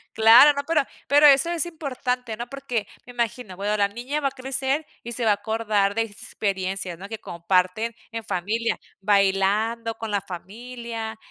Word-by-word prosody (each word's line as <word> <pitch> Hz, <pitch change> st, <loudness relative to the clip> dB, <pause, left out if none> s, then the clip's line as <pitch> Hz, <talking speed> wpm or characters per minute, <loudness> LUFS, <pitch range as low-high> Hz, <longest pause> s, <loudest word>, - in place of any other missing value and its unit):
Claro, 225 Hz, +7 st, +8 dB
¿no?, 285 Hz, 0 st, -3 dB
pero 325 Hz, -1 st, +3 dB, 0.3 s
pero 290 Hz, +1 st, +7 dB
eso 280 Hz, +3 st, +5 dB
es 345 Hz, 0 st, 0 dB
importante, 255 Hz, -7 st, -3 dB
¿no? 240 Hz, +2 st, -6 dB
Porque 250 Hz, -6 st, -3 dB, 0.2 s
me 245 Hz, -, -11 dB
imagino 235 Hz, -4 st, -3 dB
bueno 205 Hz, +3 st, -1 dB
la 200 Hz, -1 st, +3 dB
niña 245 Hz, +8 st, -4 dB
va 280 Hz, -2 st, +1 dB
a -, -, -21 dB
crecer 270 Hz, +3 st, -2 dB, 0.2 s
y 235 Hz, -, -6 dB
se 240 Hz, 0 st, -3 dB
va 220 Hz, -, +4 dB
a -, -, +6 dB
acordar 210 Hz, -2 st, 0 dB
de 225 Hz, -, +2 dB
experiencias, 195 Hz, -4 st, -3 dB
¿no? 195 Hz, -, -9 dB
Que 225 Hz, 0 st, -6 dB
comparten 185 Hz, +6 st, 0 dB, 0.2 s
en 225 Hz, -1 st, -5 dB
familia 210 Hz, +4 st, -1 dB, 0.2 s
bailando 205 Hz, +3 st, +2 dB
con 225 Hz, 0 st, -6 dB
la 205 Hz, -, 0 dB
familia, 225 Hz, +4 st, -7 dB
225 Hz, 175 wpm, -24 LUFS, 200-250 Hz, 0.3 s, Claro